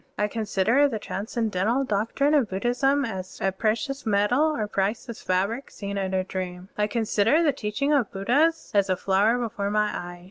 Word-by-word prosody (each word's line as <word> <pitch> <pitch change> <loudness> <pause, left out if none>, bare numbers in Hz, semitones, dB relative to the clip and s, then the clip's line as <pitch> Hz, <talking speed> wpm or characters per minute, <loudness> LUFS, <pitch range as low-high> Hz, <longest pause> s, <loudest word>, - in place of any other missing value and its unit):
I 210 - +1
consider 225 +5 +2
the 235 -6 -3
transcendental 215 +3 -1
doctrine 230 +6 0
of 270 -8 +3
Bud 190 +1 -4
dhism 270 +3 +2
as 185 -3 -7 0.2
precious 235 +5 -1
metal 210 +5 +2
or 215 -5 -2
priceless 210 +4 -2
fabric 200 +8 -1
seen 200 -1 -6
in 190 -1 -2
a 185 - +1
dream. 185 0 -6
I 210 0 +1
consider 225 +6 +2
the 295 -3 +3
teaching 270 +5 -1
of 265 -7 +2
Buddhas 290 +12 +1
as 200 -2 +3
a 185 - +1
flower 200 +5 +2
before 215 -4 -2
my 210 0 +1
eyes. 175 0 -6
215 Hz, 175 wpm, -25 LUFS, 195-245 Hz, 0.2 s, of